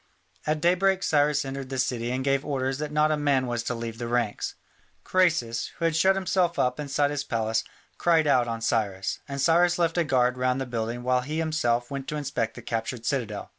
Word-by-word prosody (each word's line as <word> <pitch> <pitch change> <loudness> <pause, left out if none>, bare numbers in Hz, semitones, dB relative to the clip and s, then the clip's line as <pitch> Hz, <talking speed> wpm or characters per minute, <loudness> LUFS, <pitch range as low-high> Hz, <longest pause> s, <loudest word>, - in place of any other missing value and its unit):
At 155 0 0
daybreak 190 +3 +3
Cyrus 150 -2 +2
entered 135 -1 -5
the 135 - -4
city 120 -2 -1
and 130 +1 -1
gave 135 0 +1
orders 135 -1 -2
that 150 0 -3
not 150 +1 +3
a - - +3
man 140 -3 +2
was 120 -1 -2
to 125 - -1
leave 115 -1 -6
the 120 - -3
ranks. 120 -3 -1 0.5
Croesus, 160 -11 +1
who 165 - -1
had 165 -2 +1
shut 190 +4 +4
himself 185 -2 +1
up 125 +2 +1
inside 145 0 0
his 145 -1 -2
palace, 110 -3 -1 0.4
cried 165 -2 +3
out 130 -4 +3
on 115 -1 -3
Cyrus, 100 -4 -1
and 140 -1 -5
Cyrus 175 +5 +4
left 170 0 +1
a - - +3
guard 125 -3 +1
round 125 +1 +1
the 135 - -2
building 120 0 -3
while 125 0 +2
he 150 +5 -4
himself 120 -7 0
went 140 -1 -5
to 150 - -3
inspect 125 -6 -2
the 120 - -10
captured 115 +1 -3
citadel. 115 -6 -2
135 Hz, 210 wpm, -26 LUFS, 120-155 Hz, 0.5 s, shut